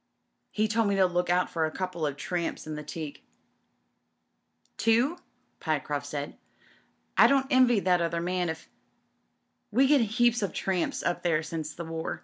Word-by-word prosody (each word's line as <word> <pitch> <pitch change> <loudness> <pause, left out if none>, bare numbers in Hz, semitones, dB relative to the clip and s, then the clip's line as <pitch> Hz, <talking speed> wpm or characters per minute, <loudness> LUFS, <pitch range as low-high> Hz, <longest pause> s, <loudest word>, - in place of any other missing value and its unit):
He 215 +1 0
told 225 0 +1
me 200 - +1
to 190 -1 +4
look 180 0 0
out 180 +1 +3
for 160 -2 0
a - - -6
couple 180 -3 -3
of 140 -1 -4
tramps 175 +2 -3
in 155 - -5
the 150 - -5
teak." 150 0 -7 1.5
"Two?'' 240 +10 +2 0.4
Pyecroft 145 -2 -2
swd. 145 0 -5 0.8
"I - - +9
don't 275 -1 +3
envy 255 -4 +5
that 180 -2 +2
other 170 0 -1
«nan 180 0 -1
if 160 0 -6 0.5
" - - -48
"We 255 +6 +4
get 280 -1 +5
heaps 240 +2 +2
of 195 -5 -2
tramps 185 -3 -1
up - - -1
there 165 -3 +1
since 155 -1 -5
the 170 - -6
war. 165 0 -4
175 Hz, 170 wpm, -28 LUFS, 160-220 Hz, 1.5 s, I